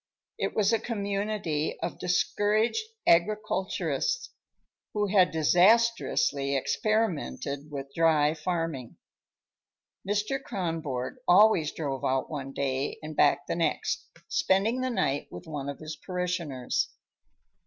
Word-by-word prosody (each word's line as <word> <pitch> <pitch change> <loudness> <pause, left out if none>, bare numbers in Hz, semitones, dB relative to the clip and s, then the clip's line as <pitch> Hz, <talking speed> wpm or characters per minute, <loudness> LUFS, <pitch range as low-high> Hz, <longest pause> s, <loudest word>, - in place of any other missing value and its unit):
It - - -2
was 210 +1 +3
a 225 - +3
community 200 -7 -2
of - - -4
discouraged 210 - +1 0.2
agriculturists 215 - +1 0.6
who 210 0 +2
had 190 -2 +4
disastrously 175 -5 +3
experimented 150 - -1
with 140 -1 -7
dry 155 -2 +3
farming. 160 -6 -3 1.1
Mr. 210 +7 0
Kronborg 165 - -3
always 180 -4 +5
drove 140 -4 -4
out 130 +3 0
one 135 -3 -5
day 135 0 -2
and 155 0 -6
back 145 -1 +3
the - - -2
next, 165 -1 -1 0.2
spending 215 +7 +2
the 255 - 0
night 165 - 0
with 90 - -9
one 145 -3 -5
of 140 - -5
his 155 0 -7
parishioners. 175 -8 -2
170 Hz, 110 wpm, -28 LUFS, 145-210 Hz, 1.1 s, always